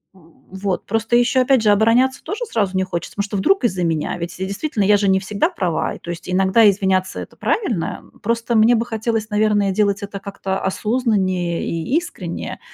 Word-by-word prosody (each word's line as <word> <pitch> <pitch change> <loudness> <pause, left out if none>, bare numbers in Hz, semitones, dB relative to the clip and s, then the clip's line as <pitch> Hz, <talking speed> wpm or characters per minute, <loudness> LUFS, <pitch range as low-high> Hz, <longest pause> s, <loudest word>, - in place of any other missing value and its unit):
м, 170 -3 -21 0.2
вот. 190 0 -3
Просто 225 +2 0
ещё, 250 +2 +3
опять 255 -1 +3
же, 215 - +3
обороняться 230 +6 +3
тоже 440 +4 -4
сразу 200 - -1
не 190 - +2
хочется, 175 -3 -5
потому 200 - 0
что 205 0 -4
вдруг 390 - +2
из-за 185 -6 0
меня? 165 0 -1
Ведь 175 +1 -6
и 190 - -1
действительно, 205 +3 -2
я 205 +1 +5
же 200 -1 +1
не 190 0 +4
всегда 200 +1 0
права. 170 -4 -2
И - - -12
то - - -11
есть 175 -1 -6
иногда 190 +4 +4
извиняться- 190 -1 0
это - - -9
правильно. 225 - -1 0.2
Просто 230 +2 0
мне 225 +2 +5
бы 230 +1 0
хотелось, 225 -1 -2
наверное, 210 -2 +2
делать 200 0 +1
это 200 0 -6
как-то 195 -1 -4
осознаннее 190 -5 0
и 165 - -2
искренне, 345 +1 -5
200 Hz, 200 wpm, -20 LUFS, 190-230 Hz, 0.2 s, я